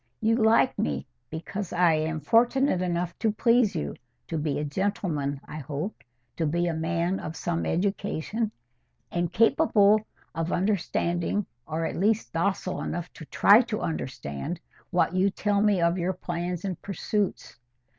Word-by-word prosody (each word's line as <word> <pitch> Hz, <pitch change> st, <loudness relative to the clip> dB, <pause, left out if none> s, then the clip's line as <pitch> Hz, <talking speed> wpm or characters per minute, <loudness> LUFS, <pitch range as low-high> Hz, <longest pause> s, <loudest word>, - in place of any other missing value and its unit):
You 225 Hz, +1 st, +3 dB
like 230 Hz, +2 st, +3 dB
me, 70 Hz, -2 st, -1 dB, 0.2 s
because 170 Hz, +4 st, -5 dB
I 175 Hz, -2 st, +4 dB
am 155 Hz, 0 st, -1 dB
fortunate 240 Hz, -, +3 dB
enough 175 Hz, -1 st, -1 dB
to 220 Hz, -1 st, +2 dB
please 230 Hz, +1 st, +3 dB
you—to 125 Hz, -, -6 dB
be 150 Hz, -2 st, -1 dB
a 150 Hz, -, -1 dB
gentleman, 150 Hz, -4 st, -1 dB
I -, -, -8 dB
hope—to 135 Hz, -, -5 dB
be 170 Hz, +3 st, +1 dB
a 170 Hz, -, 0 dB
man 170 Hz, +3 st, 0 dB
of 155 Hz, -, -6 dB
some 170 Hz, 0 st, -2 dB
education, 200 Hz, +3 st, -1 dB, 0.6 s
and 175 Hz, -1 st, -1 dB
capable 215 Hz, -4 st, +4 dB, 0.3 s
of 165 Hz, +1 st, -2 dB
understanding, 180 Hz, 0 st, 0 dB, 0.2 s
or 160 Hz, +1 st, -2 dB
at -, -, -3 dB
least 215 Hz, +4 st, +1 dB
docile 185 Hz, +2 st, -1 dB
enough 175 Hz, -1 st, -4 dB
to 160 Hz, -, -10 dB
try 205 Hz, +8 st, +6 dB
to 230 Hz, -4 st, -3 dB
understand, 70 Hz, -, -4 dB, 0.3 s
what -, -, +2 dB
you 185 Hz, +2 st, +3 dB
tell 205 Hz, +1 st, 0 dB
me 205 Hz, -3 st, +3 dB
of 170 Hz, +2 st, +2 dB
your 180 Hz, +2 st, 0 dB
plans 175 Hz, 0 st, -4 dB
and 185 Hz, -4 st, -4 dB
pursuits. 200 Hz, 0 st, -2 dB
175 Hz, 145 wpm, -27 LUFS, 160-205 Hz, 0.6 s, try